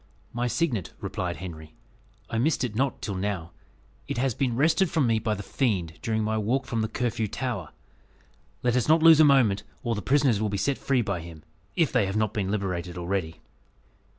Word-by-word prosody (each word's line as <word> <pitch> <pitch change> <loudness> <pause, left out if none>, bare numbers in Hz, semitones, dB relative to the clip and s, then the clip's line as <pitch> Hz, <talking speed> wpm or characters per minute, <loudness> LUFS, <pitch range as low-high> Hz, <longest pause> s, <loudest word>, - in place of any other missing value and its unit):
"My 120 +1 -1
signet," 120 - -1
replied - - -3
Henry, 80 -1 -9 0.5
"I 115 - -2
missed 145 +3 +1
it 120 -4 -2
not 130 +3 -1
till 105 - -2
now. 95 -3 -3 0.6
It - - -3
has 130 0 +1
been 125 0 -1
wrested 160 +7 +3
from 155 -4 +2
me 115 -2 +2
by 110 -1 -1
the 100 - -7
fiend, 95 - -1
during 110 -1 0
my 110 +1 0
walk 125 +5 0
from 115 -2 -2
the 110 - 0
Curfew 115 -1 -1
Tower. 110 - -4 0.9
Let 120 -1 +2
us 125 - +1
not 160 +1 +4
lose 165 -2 +8
a - - +9
moment, 125 -9 +4 0.2
or 120 -2 0
the 105 - -3
prisoners 130 -2 +2
will 110 - 0
be 100 - -2
set 140 +7 0
free 130 -3 +1
by 100 -4 -2
him, 80 -2 -10 0.3
if 165 -5 +2
they 100 - +2
have 95 +2 -2
not 110 -1 0
been 100 -3 -1
liberated 90 -4 -2
already." 85 -2 -3
110 Hz, 205 wpm, -26 LUFS, 95-130 Hz, 0.9 s, a